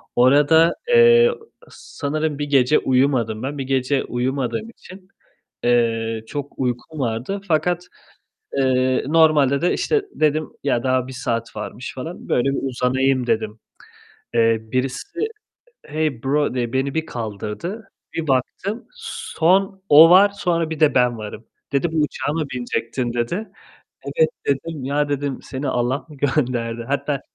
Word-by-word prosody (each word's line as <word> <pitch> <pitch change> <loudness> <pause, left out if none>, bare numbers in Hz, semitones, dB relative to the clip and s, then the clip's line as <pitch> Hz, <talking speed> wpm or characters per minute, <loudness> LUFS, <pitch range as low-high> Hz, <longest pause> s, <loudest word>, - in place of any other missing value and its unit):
Orada, 145 +6 +5
eee, 475 0 +6
ı 475 - -4 0.3
sanırım 150 0 -4
1 145 - -1
gece 135 +1 +4
uyumadım 125 -4 +1
ben. 145 +2 -4
1 135 - -3
gece 135 +1 0
uyumadığım 130 - -2
için, 185 -4 -14 0.6
eee, 115 -2 +1
çok 145 +1 -5
uykum 130 +4 -3
vardı 125 - -2
fakat, 175 +2 +1 0.7
eee, 130 -1 +2
normalde 150 -3 +4
de 175 - +2
işte 445 -3 +1
dedim 155 0 +1 0.2
ya 120 -4 +1
"Daha 130 -1 +1
1 - - -7
saat 115 -3 -3
varmış." 110 +3 -6
falan, 160 +7 -7
böyle 130 +3 +2
bir 135 - -2
uzanayım 130 0 +1
dedim. 110 -1 -1 0.8
Eee, 115 -1 +3
birisi 130 - -3 0.7
"Hey 150 -5 -2
bro" 145 0 +1
diye 120 -1 -2
beni 135 +1 -1
bir 160 0 -1
kaldırdı. 120 - -6 0.2
Bir 160 -2 -3
baktım, 190 - -1
son 195 - 0
o 155 +3 +9
var, 195 +3 +7
sonra 170 -5 -1
bir 160 - -5
de 155 -2 +4
ben 125 -2 +2
varım. 110 +1 -8 0.3
Dedi 155 +4 0
"Bu - - -3
uçağa 145 0 -2
mı 160 0 -1
binecektin?" 120 0 -2
dedi. 130 - -2 0.6
"Evet," 480 -1 +2 0.2
dedim, 140 0 -2
"Ya," 145 +2 0
dedim, 145 -1 -2
"Seni 135 +1 -5
Allah 125 +2 0
mı 150 - -13
gönderdi?" 120 -5 -1
Hatta 140 0 -1
135 Hz, 145 wpm, -21 LUFS, 125-160 Hz, 0.8 s, o